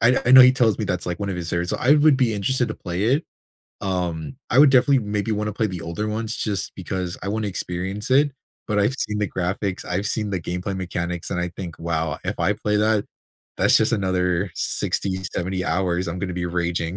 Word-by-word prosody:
I 120 +3 +4
I 120 - +2
know 130 0 +11
he 125 0 +8
tells 115 -5 +2
me - - -1
that's, - - -2
like, 90 +2 -3
one 100 - -2
of 95 - -2
his 85 -1 -4
favorites. 85 +1 -1
So - - 0
I 130 - +2
would 150 -2 +5
be 125 -4 +2
interested 120 +5 0
to - - -4
play 90 +3 -3
it. 140 +8 +2 0.6
Um, 90 - -3
I 130 - +2
would 145 -2 +8
definitely 130 +1 +4
maybe 105 0 -2
wanna 105 0 -1
play 110 +1 0
the 90 -4 -5
older 85 +6 -4
ones, 110 +1 -3
just 100 -4 -2
because 90 -2 -4
I 100 - -5
wanna 105 0 -1
experience 95 +5 -4
it. 145 +2 +4 0.4
But 105 -1 +1
I've 105 +6 +2
seen 105 -5 -2
the 105 - +1
graphics, 95 +1 -2
I've 95 +3 -2
seen 105 -1 -1
the 95 -3 -2
gameplay 90 +3 -4
mechanics, 90 -2 -4
and 90 - -1
I 90 - -1
think, 85 -1 -8
"Wow. 80 -2 -2
If - - -3
I 90 +5 +2
play 105 0 -1
that, 105 -1 +2 0.5
that's - - +5
just 110 +2 +2
another 95 -2 0
60, 95 -1 -1
70 90 +1 -2
hours 90 +1 0
I'm 90 +2 -4
gonna 90 -1 -3
be 85 0 -2
raging." 85 0 -2
95 Hz, 225 wpm, -23 LUFS, 90-110 Hz, 0.6 s, know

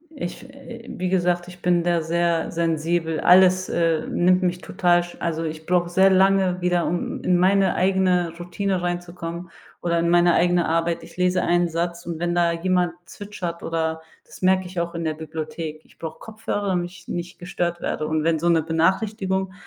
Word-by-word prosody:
Ich 175 -11 -6
äh, 255 -4 -11
wie 185 0 -3
gesagt, 175 -1 +1
ich 180 0 -13
bin 175 -1 +2
da 175 -1 +1
sehr 170 0 0
sensibel. 165 0 -1
Alles, 185 +1 +5
äh, 165 -2 +1
nimmt 180 +1 +3
mich 180 -1 0
total 175 -1 +2
sch 175 - -11
also, 165 -1 -2
ich 160 0 -5
brauche 175 0 +1
sehr 190 +2 +5
lange 190 -1 +3
wieder, 175 -1 +1
um 175 +2 -3
in 180 - +3
meine 195 +2 +3
eigene 185 -2 +2
Routine 180 +2 -2
reinzukommen 175 0 -5 0.3
oder 170 -1 0
in 170 0 +1
meine 175 0 +4
eigene 175 0 +2
Arbeit. 165 +1 0
Ich - - -14
lese 180 0 +2
einen 175 0 +2
Satz 170 +1 -3
und 165 -1 -5
wenn 175 0 -1
da 170 -1 +3
jemand 180 0 0
zwitschert 185 -5 -7
oder 160 -1 -2 0.2
das - - -15
merke 185 0 +3
ich 180 0 -5
auch 170 0 -3
in 170 - -3
der 160 -1 -1
Bibliothek, 155 0 -6
ich - - -24
brauche 160 -1 -7
Kopfhörer, 215 -2 -4
damit 175 -1 -1
ich 175 -1 -16
nicht 175 0 -5
gestört 175 -1 -3
werde. 155 - -2
Und 155 -1 0
wenn 165 0 +1
so 170 - -1
'ne 165 -1 +4
Benachrichtigung, 190 +3 0
175 Hz, 190 wpm, -23 LUFS, 165-185 Hz, 0.3 s, Alles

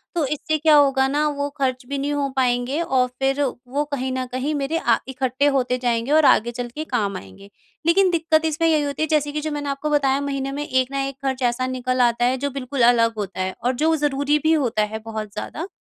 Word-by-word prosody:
तो 330 -4 +1
इससे 300 +2 -1
क्या 310 0 +4
होगा 270 -2 +4
ना 295 +2 +1
वो 285 0 -2
खर्च 255 -2 -1
भी 280 - -2
नहीं 285 +1 -2
हो 285 -1 -1
पाएँगे 250 +2 0
और 260 -6 +1
फिर 270 +1 +1 0.3
वो 280 +4 -1
कहीं 260 -1 -2
न 260 0 -2
कहीं 260 +4 -2
मेरे 285 +3 -1
अ, 235 -8 +2
इकट्ठे 265 +1 -1
होते 250 -1 +1
जाएँगे 235 +2 0
और 310 0 +5
आगे 235 -2 +4
चल 245 0 -5
के 310 - -3
काम 210 -8 -1
आएँगे। 95 - -13 0.4
लेकिन 370 +3 +4
दिक्कत 320 -1 +2
इसमें 320 +1 +1
यही 310 -2 +3
होती 285 +1 -3
है - - 0
जैसे 295 -1 +1
कि 300 - -3
जो 310 +1 -3
मैंने 290 -1 -3
आपको 280 +2 -3
बताया 275 -2 +2
महीने 275 -1 -3
में 290 +2 -4
एक 255 -1 +1
न - - -5
एक 275 0 -2
खर्च 265 -1 -1
ऐसा 255 +2 -3
निकल 255 0 -1
आता 240 0 +2
है 255 +1 +1
जो 285 +2 -2
बिल्कुल 270 -1 -4
अलग 230 -1 +4
होता 200 -3 -5
है 185 0 -2
और 250 +2 +1
जो 320 0 +3
ज़रूरी 290 0 +1
भी 315 +1 +4
होता 245 -8 +1
है 215 +1 -4
बहुत 215 -2 -5
ज़्यादा। 320 - -5
270 Hz, 240 wpm, -22 LUFS, 250-295 Hz, 0.4 s, और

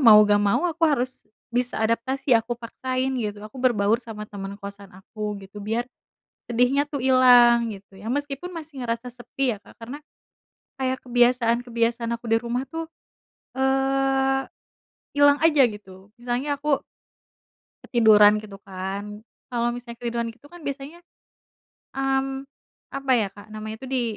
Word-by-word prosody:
mau 215 -2 +10
nggak 205 0 +4
mau 205 - +2
aku 330 0 -7
harus 255 -3 -1 0.3
bisa 245 +1 0
adaptasi, 255 +5 0
aku 230 +1 +2
paksain 255 +2 -3
gitu. 210 -1 -4
Aku 255 +5 -9
berbaur 225 -3 +2
sama 220 -3 -7
teman 200 -1 -7
kosan 200 0 -9
aku 210 +2 -6
gitu. 195 +2 -10
Biar 225 +4 -1 0.6
sedihnya 250 +4 +3
tuh 290 -1 -5
ilang, 245 -2 +6
gitu 195 -1 -13
ya. 205 +4 -8
Meskipun 290 +5 -3
masih 315 -5 -8
ngerasa 230 +1 -3
sepi 245 -1 -2
ya, - - -16
Kak. - - -18
Karena, 250 +6 -7 0.8
kayak 260 0 0
kebiasaan-kebiasaan 240 -1 +2
aku 235 - -16
di 225 0 +3
rumah 245 +2 -2
tuh, 325 +4 -6 0.7
eee, 270 0 +2 0.7
ilang 285 0 +7
aja 305 -4 +5
gitu. 205 -2 -11
Misalnya 245 +4 -2
aku 285 -1 0 1.0
ketiduran 215 -3 +6
gitu 205 -2 -10
kan. 195 +2 -6 0.3
Kalau 240 -1 0
misalnya 240 -1 -8
ketiduran 235 -1 -2
gitu 245 +5 -19
kan 350 - -12
biasanya, 280 +4 -5 0.9
mmm, 270 0 -1 0.4
apa 275 -1 -2
ya, 225 -5 +3
Kak, 205 +2 -14
namanya 215 0 -6
itu - - -6
di 260 -2 +1
240 Hz, 145 wpm, -24 LUFS, 215-270 Hz, 1.0 s, mau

